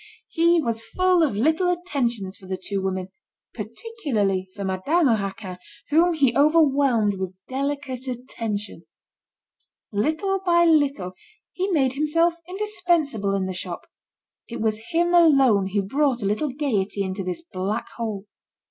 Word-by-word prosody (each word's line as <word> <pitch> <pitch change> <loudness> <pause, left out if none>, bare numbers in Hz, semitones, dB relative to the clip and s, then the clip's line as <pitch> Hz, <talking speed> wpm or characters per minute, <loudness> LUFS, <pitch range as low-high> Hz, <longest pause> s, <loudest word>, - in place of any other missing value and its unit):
He 335 +1 +3
was 230 -6 -1
full 365 +6 +2
of 300 -10 +2
little 315 - +2
attentions 245 - -1
for 190 - -14
the 190 0 -3
two 195 +1 -3
women, 190 -1 -3 0.4
particularly 215 - -2
for 200 - -5
Madame 260 - +2
Raquin, 195 -4 -2 0.3
whom 335 +3 +4
he 275 -6 +2
overwhelmed 280 - +3
with 190 -1 -5
delicate 270 -1 -3
attention. 230 -4 -5 1.1
Little 315 - 0
by 345 -2 +4
little 285 - +2 0.4
he 375 +1 -1
made 270 -8 +2
himself 315 +4 +2 0.2
indispensable 345 - 0
in 195 -1 -1
the 185 - -3
shop; 180 -1 -6 0.6
it 235 - -6
was 215 -1 0
him 345 +1 +1
alone 270 - +5
who 200 +1 0
brought 265 +2 0
a - - -1
little 215 +9 0
gaiety 220 -8 -1
into 190 +1 -4
this 185 - -4
black 195 - -3
hole. 215 -4 -4
255 Hz, 140 wpm, -24 LUFS, 200-320 Hz, 1.1 s, alone